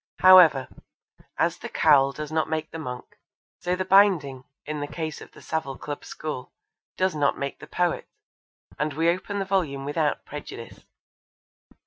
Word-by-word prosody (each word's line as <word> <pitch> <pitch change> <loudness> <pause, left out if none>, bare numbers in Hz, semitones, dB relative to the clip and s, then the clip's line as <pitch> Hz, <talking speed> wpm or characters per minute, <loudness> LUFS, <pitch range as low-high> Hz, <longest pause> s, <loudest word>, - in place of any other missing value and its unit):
However, 175 -8 +7 0.7
as - - 0
the - - -7
cowl 140 -3 +4
does 150 +2 -7
not 160 0 0
make 160 0 -3
the 165 - -6
monk, 125 -5 -8 0.4
so 180 +1 -1
the 185 +1 -3
binding, 180 -10 +3 0.2
in 150 0 -4
the 145 - -3
case 155 -1 -5
of - - -12
the - - -15
Savile 140 -4 -3
Club 145 -1 -6
school, 150 -5 -6 0.5
does 185 0 +1
not 145 -2 +1
make 140 0 -4
the - - -11
poet, 175 -1 -1 0.7
and 150 0 -1
we 165 +3 +2
open 190 +3 -4
the 195 - -1
volume 160 -8 -1
without 150 +1 -1
prejudice. 145 -5 -9
155 Hz, 160 wpm, -25 LUFS, 140-175 Hz, 0.7 s, However